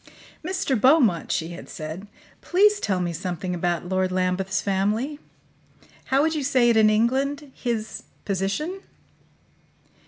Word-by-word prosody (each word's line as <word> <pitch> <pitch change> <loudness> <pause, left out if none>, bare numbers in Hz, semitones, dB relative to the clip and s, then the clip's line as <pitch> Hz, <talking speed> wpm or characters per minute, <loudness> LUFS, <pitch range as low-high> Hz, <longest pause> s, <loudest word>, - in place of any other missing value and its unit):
"Mr. 370 -3 -1
Beaumont," 245 - +3
she 165 0 -1
had 175 +1 -9
said, 160 +4 -7 0.3
"please 410 +3 +3
tell 190 - 0
me 175 -1 -2
something 180 +1 -4
about 175 0 -1
Lord 185 0 0
Lambeth's 185 +1 0
family. 210 +9 -1 0.9
How 270 +2 +2
would 320 +1 +1
you 300 -3 -2
say 255 -3 +3
it - - +1
in 215 -1 +6
England 270 +6 0
his 230 -3 -3 0.2
position?" 200 - -2
215 Hz, 130 wpm, -24 LUFS, 185-275 Hz, 0.9 s, in